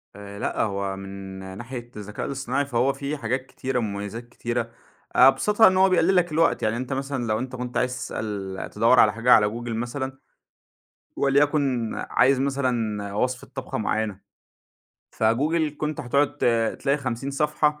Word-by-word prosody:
آآ 100 Hz, 0 st, -9 dB
لأ -, -, -1 dB
هو 100 Hz, -2 st, -1 dB
من 95 Hz, 0 st, -8 dB, 0.2 s
ناحية 120 Hz, 0 st, -7 dB
الذكاء 105 Hz, 0 st, -6 dB
الاصطناعي 140 Hz, +1 st, -1 dB
فهو 130 Hz, +1 st, +1 dB
في 145 Hz, +2 st, -4 dB
حاجات 130 Hz, +2 st, -2 dB
كتيرة، 130 Hz, -1 st, -3 dB
ومميزات 105 Hz, +2 st, -5 dB
كتيرة، 120 Hz, 0 st, -2 dB, 0.5 s
آآ 130 Hz, -, +8 dB
أبسطها 210 Hz, +10 st, +5 dB
إن 185 Hz, 0 st, +3 dB
هو 190 Hz, 0 st, +5 dB
بيقلل 185 Hz, +1 st, +3 dB
لك 175 Hz, -2 st, +3 dB
الوقت. 165 Hz, +2 st, +2 dB
يعني 110 Hz, +2 st, +1 dB
أنت 130 Hz, +2 st, -3 dB
مثلًا 135 Hz, -3 st, -3 dB
لو 110 Hz, 0 st, +1 dB
أنت 130 Hz, 0 st, -5 dB
كنت 125 Hz, 0 st, -4 dB
عايز 125 Hz, 0 st, +1 dB
تسأل 100 Hz, -3 st, -5 dB
تدوّر 120 Hz, +2 st, +4 dB
على 105 Hz, -1 st, +6 dB
حاجة 115 Hz, +2 st, +1 dB
على 105 Hz, -, +6 dB
Google 120 Hz, +2 st, -6 dB
مثلًا، 130 Hz, +4 st, -3 dB, 1.0 s
وليكُن 140 Hz, -4 st, +2 dB, 0.2 s
عايز 130 Hz, +1 st, +4 dB
مثلًا 120 Hz, -7 st, -1 dB
وصفة 125 Hz, +3 st, -1 dB
طبخة 130 Hz, -4 st, -4 dB
مُعيّنة، 110 Hz, -2 st, -1 dB, 1.0 s
فGoogle 150 Hz, +7 st, +1 dB
كنت 150 Hz, 0 st, -2 dB
هتقعد 140 Hz, +4 st, +1 dB
ت -, -, -1 dB, 0.4 s
تلاقي 140 Hz, +1 st, +1 dB
50 130 Hz, +1 st, -3 dB
صفحة، 150 Hz, +1 st, +1 dB
125 Hz, 160 wpm, -24 LUFS, 110-140 Hz, 1.0 s, آآ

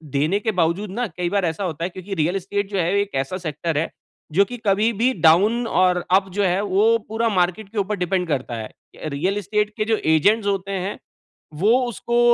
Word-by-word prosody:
देने 155 Hz, +8 st, +2 dB
के 220 Hz, +1 st, -1 dB
बावजूद 170 Hz, +5 st, +1 dB
ना 240 Hz, +4 st, -2 dB
कई 175 Hz, -1 st, -3 dB
बार 200 Hz, 0 st, +1 dB
ऐसा 165 Hz, +4 st, -2 dB
होता 165 Hz, -3 st, -3 dB
है 175 Hz, -, -1 dB
क्योंकि 190 Hz, +2 st, -8 dB
रियल 165 Hz, +2 st, 0 dB
एस्टेट 195 Hz, +1 st, -2 dB
जो 200 Hz, -, -1 dB
है 175 Hz, 0 st, +1 dB
एक 205 Hz, -5 st, -5 dB
ऐसा 185 Hz, +7 st, -5 dB
सेक्टर 165 Hz, -2 st, -3 dB
है 160 Hz, -, 0 dB, 0.5 s
जो 200 Hz, -, +6 dB
कि 245 Hz, -, -4 dB
कभी 210 Hz, +4 st, +3 dB
भी 255 Hz, +2 st, +3 dB
डाउन 210 Hz, +9 st, +5 dB
और 180 Hz, -3 st, +2 dB, 0.2 s
अप 195 Hz, -1 st, -15 dB
जो 205 Hz, +1 st, +1 dB
है 185 Hz, +1 st, +2 dB
वो 210 Hz, +3 st, +3 dB
पूरा 225 Hz, +1 st, 0 dB
मार्केट 185 Hz, +1 st, 0 dB
के 220 Hz, -, -10 dB
ऊपर 205 Hz, +1 st, 0 dB
डिपेंड 180 Hz, 0 st, -1 dB
करता 130 Hz, -5 st, -2 dB
है। 110 Hz, -1 st, -6 dB, 0.4 s
रियल 175 Hz, +8 st, -1 dB
एस्टेट 210 Hz, +1 st, 0 dB
के 215 Hz, -, 0 dB
जो 220 Hz, -, +3 dB, 0.2 s
एजेंट्स 205 Hz, +7 st, +3 dB
होते 195 Hz, -1 st, -1 dB
हैं 200 Hz, -, -4 dB, 0.6 s
वो 220 Hz, +6 st, +5 dB
उसको 235 Hz, +1 st, -2 dB
195 Hz, 215 wpm, -22 LUFS, 175-210 Hz, 0.6 s, जो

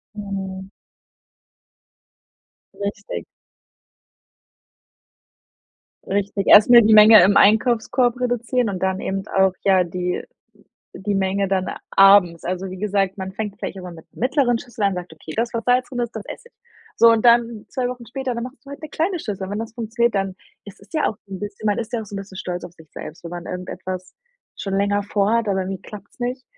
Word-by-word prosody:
Mhm. 195 Hz, -2 st, -6 dB, 2.1 s
Richtig. 200 Hz, -, -5 dB, 2.8 s
Richtig, 200 Hz, 0 st, -2 dB
erstmal 235 Hz, +3 st, +8 dB
die 220 Hz, 0 st, +4 dB
Menge 215 Hz, +1 st, +9 dB
im 200 Hz, +1 st, +4 dB
Einkaufskorb 235 Hz, +3 st, +3 dB
reduzieren 245 Hz, -1 st, 0 dB
und 190 Hz, -2 st, -4 dB
dann 190 Hz, 0 st, 0 dB
eben 195 Hz, 0 st, -3 dB
auch, 190 Hz, -1 st, +2 dB
ja, 190 Hz, -2 st, +4 dB
die 180 Hz, +1 st, -3 dB, 0.8 s
die 205 Hz, +1 st, -2 dB
Menge 195 Hz, 0 st, 0 dB
dann 190 Hz, -1 st, 0 dB, 0.2 s
abends. 195 Hz, -4 st, +5 dB
Also 185 Hz, +2 st, -3 dB
wie 185 Hz, -, -8 dB
gesagt, 200 Hz, -1 st, -1 dB
man 190 Hz, 0 st, -5 dB
fängt 205 Hz, 0 st, -5 dB
vielleicht -, -, -5 dB
auch -, -, -8 dB
mal 180 Hz, -1 st, -8 dB
mit 160 Hz, -, -14 dB
mittleren 255 Hz, -1 st, +1 dB
Schüsseln 235 Hz, -3 st, -5 dB
an 195 Hz, -, +1 dB
und 185 Hz, -, -5 dB
sagt: 175 Hz, -2 st, -9 dB
„Okay, 160 Hz, 0 st, -10 dB
das, 235 Hz, +1 st, 0 dB
was 230 Hz, -1 st, -3 dB
Salz 250 Hz, 0 st, +2 dB
drin 250 Hz, -, -7 dB
ist, 240 Hz, -1 st, -3 dB
das 220 Hz, -2 st, -6 dB
esse 475 Hz, -, -10 dB
ich.“ -, -, -46 dB, 0.4 s
So, 230 Hz, -, +7 dB
und 225 Hz, +1 st, +2 dB
dann 235 Hz, -2 st, +3 dB
2 250 Hz, -1 st, -2 dB
Wochen 245 Hz, -1 st, -7 dB
später, 255 Hz, +1 st, -4 dB
dann 235 Hz, -, -4 dB
machst 250 Hz, 0 st, -11 dB
du 275 Hz, -, -12 dB
halt 280 Hz, -, -9 dB
'ne 310 Hz, -, -7 dB
kleine 345 Hz, +4 st, -1 dB
Schüssel. 200 Hz, -, -5 dB
Und 190 Hz, -, -7 dB
wenn 205 Hz, -, -3 dB
das 225 Hz, 0 st, -7 dB
funktioniert, 235 Hz, 0 st, 0 dB
dann 195 Hz, -1 st, -1 dB, 0.3 s
es 200 Hz, -, -12 dB
ist 200 Hz, -, -20 dB
ja 310 Hz, -, +1 dB
auch 220 Hz, -, -5 dB
'n 190 Hz, -1 st, -6 dB
bisschen 205 Hz, +1 st, -6 dB
man 205 Hz, -1 st, +1 dB
ist 230 Hz, 0 st, -5 dB
ja 235 Hz, -, -1 dB
auch -, -, -7 dB
so 205 Hz, -, -10 dB
'n -, -, -3 dB
bisschen 195 Hz, -1 st, -9 dB
stolz 180 Hz, -1 st, -4 dB
auf 170 Hz, -, -10 dB
sich 160 Hz, -3 st, -18 dB
selbst, 160 Hz, +3 st, -9 dB
wenn 170 Hz, -, -7 dB
man 175 Hz, 0 st, -7 dB
irgendetwas 185 Hz, 0 st, -6 dB, 0.4 s
schon 195 Hz, -1 st, -4 dB
länger 205 Hz, +1 st, +1 dB
vorhat, 210 Hz, +2 st, 0 dB
aber 190 Hz, -1 st, +1 dB
irgendwie 190 Hz, 0 st, -5 dB
klappt's 210 Hz, +3 st, -12 dB
nicht, 250 Hz, +2 st, -3 dB
205 Hz, 195 wpm, -21 LUFS, 190-235 Hz, 2.8 s, Menge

